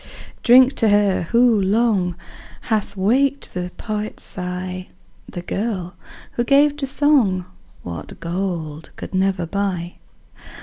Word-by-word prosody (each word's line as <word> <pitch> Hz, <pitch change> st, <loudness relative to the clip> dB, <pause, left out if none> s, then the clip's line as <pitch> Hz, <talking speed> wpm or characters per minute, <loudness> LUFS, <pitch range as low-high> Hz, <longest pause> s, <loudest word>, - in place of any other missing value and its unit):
Drink 255 Hz, +2 st, +6 dB
to 225 Hz, -, +4 dB
her, 205 Hz, -2 st, +3 dB
who 235 Hz, -3 st, +4 dB
long, 195 Hz, -3 st, +2 dB, 0.5 s
Hath 210 Hz, -2 st, -2 dB
waked 265 Hz, +8 st, +1 dB
the 180 Hz, 0 st, -3 dB
poet's 215 Hz, -1 st, -4 dB
sigh. 180 Hz, 0 st, -5 dB, 0.4 s
The 175 Hz, -, -6 dB
girl, 190 Hz, -3 st, -3 dB, 0.4 s
who 240 Hz, -, -1 dB
gave 285 Hz, +3 st, +4 dB
to 275 Hz, -2 st, -2 dB
song 265 Hz, -10 st, +2 dB, 0.4 s
What 85 Hz, -1 st, -8 dB
gold 170 Hz, -3 st, -4 dB
could -, -, -8 dB
never 190 Hz, -2 st, +1 dB
buy. 180 Hz, -1 st, -3 dB
200 Hz, 120 wpm, -21 LUFS, 180-235 Hz, 0.5 s, Drink